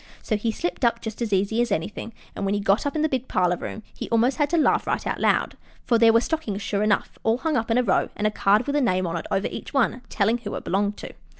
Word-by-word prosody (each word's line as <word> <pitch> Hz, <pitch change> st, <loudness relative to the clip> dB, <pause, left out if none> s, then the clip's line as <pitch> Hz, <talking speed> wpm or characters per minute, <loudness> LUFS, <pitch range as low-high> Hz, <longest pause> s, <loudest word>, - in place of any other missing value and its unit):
So 220 Hz, -, 0 dB
he 225 Hz, +2 st, -1 dB
slipped 345 Hz, +4 st, -4 dB
up 235 Hz, -1 st, +3 dB
just 220 Hz, 0 st, -7 dB
as 230 Hz, -3 st, -1 dB
easy 200 Hz, +4 st, +1 dB
as 240 Hz, -2 st, -1 dB
anything, 205 Hz, +5 st, -3 dB, 0.2 s
and -, -, -4 dB
when 195 Hz, +1 st, 0 dB
he -, -, 0 dB
got 200 Hz, +7 st, +1 dB
up 285 Hz, -, -4 dB
in 310 Hz, -, +1 dB
the -, -, +4 dB
big 260 Hz, -3 st, -2 dB
parlor 180 Hz, -1 st, +1 dB
room 220 Hz, -, -7 dB
he -, -, -6 dB
almost 235 Hz, +3 st, +2 dB
had 295 Hz, -2 st, +1 dB
to 340 Hz, -, +1 dB
laugh 315 Hz, -, +2 dB
right -, -, -1 dB
out -, -, -2 dB
loud, -, -, +1 dB, 0.3 s
for 235 Hz, -2 st, +3 dB
there 230 Hz, -1 st, +7 dB
were 225 Hz, -, +5 dB
the -, -, -3 dB
stockings 220 Hz, -11 st, -3 dB
sure 200 Hz, 0 st, -1 dB
enough, 210 Hz, -1 st, 0 dB
all 225 Hz, +1 st, +2 dB
hung 315 Hz, +3 st, -1 dB
up 225 Hz, -2 st, -1 dB
in 230 Hz, -, +2 dB
a 250 Hz, -, +3 dB
row, 195 Hz, -6 st, +1 dB
and 210 Hz, -, -2 dB
a 215 Hz, -, +3 dB
card 210 Hz, +3 st, +2 dB
with 285 Hz, -, -2 dB
a 295 Hz, -, +3 dB
name 185 Hz, -7 st, +1 dB
on 170 Hz, -1 st, -3 dB
it 170 Hz, -, -4 dB
over 195 Hz, +1 st, 0 dB
each -, -, -8 dB
one 250 Hz, -1 st, +1 dB
telling 225 Hz, +3 st, +1 dB
who 210 Hz, -3 st, -6 dB
it -, -, -5 dB
belonged 200 Hz, +2 st, 0 dB
to. -, -, -8 dB
225 Hz, 295 wpm, -24 LUFS, 200-250 Hz, 0.3 s, there